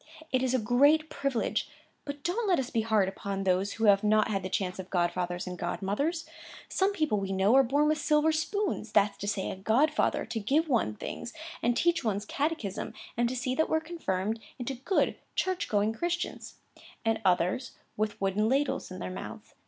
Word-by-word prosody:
It 255 - +2
is 260 0 +1
a - - +4
great 285 +7 +4
privilege, 275 -4 -1 0.4
but 285 0 -6
don't 415 +6 0
let 370 - +4
us 265 -1 -2
be 230 - +1
hard 215 -3 +2
upon 195 0 -4
those 190 +1 +1
who 225 - -4
have 200 -1 +5
not 215 0 +3
had 195 -2 0
the 185 - -4
chance 185 -1 -2
of 190 0 -6
godfathers 175 0 -1
and 180 -1 -6
godmothers. 210 - -1 0.4
Some 385 +1 +1
people, 310 - 0
we 195 -1 -3
know, 195 +3 +3
are 270 - +8
born 285 +4 +2
with 310 0 +2
silver 300 +1 +3
spoons,—that's 315 - 0
to 200 - -4
say, 205 -2 -1
a - - -5
godfather 225 +11 +2
to 225 - -3
give 285 +10 +2
one 230 - +1
things, 235 - -6 0.3
and 240 0 +1
teach 335 -3 +2
one's 205 -2 -1
catechism, 285 - -2 0.2
and 235 0 +2
see 255 0 -2
that 315 +4 +1
we're 315 - +3
confirmed 225 - -2 0.2
into 255 +1 -3
good 270 +10 0 0.2
church 370 -1 0
going 210 +1 +2
Christians,—and 250 -7 -4
others 185 +6 +1 0.2
with 215 0 -2
wooden 200 +3 +1
ladles 275 +2 0
in 185 - -7
their 90 - -5
mouths. 90 - -8
225 Hz, 185 wpm, -29 LUFS, 195-300 Hz, 0.4 s, are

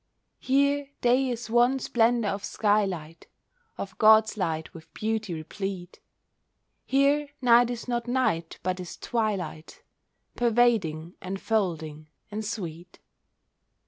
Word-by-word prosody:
Here 280 +1 +1
day 255 +2 +3
is 240 -2 -4
one 240 +3 +3
splendour 235 -4 +1
of 200 +1 -5
sky 210 -1 +2
light— 165 -4 -7 0.5
Of 195 -2 -6
God's 220 0 +6
light 165 -5 -3
with 165 -3 -13
beauty 215 -2 -2
replete. 180 +3 -6 0.9
Here 280 +2 +2
night 240 -1 +5
is 240 0 -5
not 240 -1 -2
night, 240 -10 0
but 185 +1 -1
is 180 -1 -7
twilight, 210 -9 -3 0.5
Pervading, 215 -9 +1
enfolding, 180 -6 -2 0.2
and 215 +1 -4
sweet. 180 -5 -6
215 Hz, 110 wpm, -27 LUFS, 180-240 Hz, 0.9 s, God's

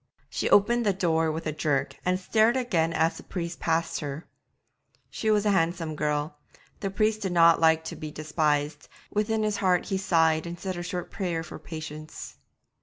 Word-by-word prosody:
She - - -1
opened 235 +4 +4
the 205 -3 +2
door 165 -4 +1
with 160 +1 -5
a 155 - 0
jerk 145 -2 -1
and 180 0 +1
stared 220 +5 +3
again 180 -11 +1
as 165 0 +1
the - - -10
priest 170 -2 -5
passed 165 0 0
her. 145 +2 -5 0.9
She 220 - -2
was 210 -1 +3
a 205 - +4
handsome 165 -3 0
girl; 150 0 -2 0.4
the 195 - -2
young 195 - -7
priest 215 0 +1
did 190 -3 -2
not 170 -1 +6
like 160 0 +4
to - - -6
be 155 - -6
despised; 150 -1 -1 0.2
within 215 +1 0
his 210 -1 0
heart 185 -3 +2
he 195 - 0
sighed 160 -3 +2
and 170 0 -7
said 190 -1 -4
a 175 - -4
short 175 0 -5
prayer 175 -5 -2
for - - -9
patience. 155 -1 -8
170 Hz, 190 wpm, -27 LUFS, 155-195 Hz, 0.9 s, not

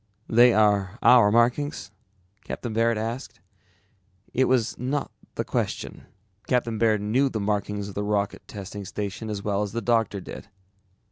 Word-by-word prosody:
"They 120 +2 +6
are 105 -2 +2
our 120 -5 +7
markings?" 120 +1 +1 0.5
Captain 120 -3 -5
Baird 115 0 +2
asked. 115 +4 -5 0.9
It 130 - +3
was 125 -3 +1
not 135 +4 -2 0.2
the - - -2
question. - - -3 0.4
Captain 120 -3 0
Baird 110 -2 +3
knew 125 +7 +2
the 110 - -3
markings 105 0 -2
of 100 - -8
the 100 - -3
Rocket 105 -1 -2
Testing 100 0 -7
Station 105 +3 -5
as 100 -2 -4
well 100 -1 0
as 105 -1 -3
the 115 - -1
doctor 115 -4 +1
did. - - -9
110 Hz, 150 wpm, -25 LUFS, 105-120 Hz, 0.9 s, our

